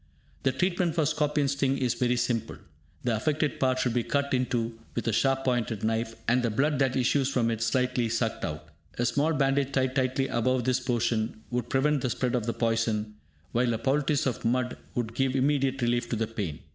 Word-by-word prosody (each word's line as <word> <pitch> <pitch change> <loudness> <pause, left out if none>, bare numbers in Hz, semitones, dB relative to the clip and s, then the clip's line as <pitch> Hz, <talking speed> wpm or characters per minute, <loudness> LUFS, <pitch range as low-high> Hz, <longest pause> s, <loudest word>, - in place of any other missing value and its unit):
The 135 - +2
treatment 175 +4 0
for 160 -3 +2
scorpion 150 -1 +1
sting 135 0 +1
is 125 -3 +1
very 125 -1 +1
simple. 120 -2 -1 0.5
The 120 -3 +1
affected 150 +6 0
part 130 -1 +2
should 125 -2 0
be 120 - +2
cut 140 +3 -1
into 120 -3 -1 0.2
with 120 - -2
a 115 - +1
sharp 135 +3 +2
pointed 120 -4 0
knife, 115 +1 -1
and 125 +2 +3
the 120 - +1
blood 140 +6 +1
that 130 -2 +2
issues 135 +1 +2
from 120 -4 +1
it 115 -1 -3
slightly 125 +1 +1
sucked 115 0 -1
out. 75 0 -5 0.3
A 120 - +1
small 145 +6 +2
bandage 140 -2 +1
tied 130 -1 +1
tightly 130 0 +1
above 130 +1 +1
this 130 +1 +1
portion 115 -3 -1
would 120 -1 -2
prevent 145 +1 +2
the 130 - 0
spread 125 +1 -1
of 120 -3 -1
the - - +2
poison, 115 -2 0 0.4
while 120 0 +2
a - - -1
poultice 140 +4 +1
of 130 -4 -2
mud 125 +1 0 0.2
would 115 -2 -2
give 135 +1 0
immediate 135 -1 +1
relief 120 0 +1
to - - 0
the 115 0 0
pain. 105 -9 -5
125 Hz, 205 wpm, -28 LUFS, 115-135 Hz, 0.5 s, and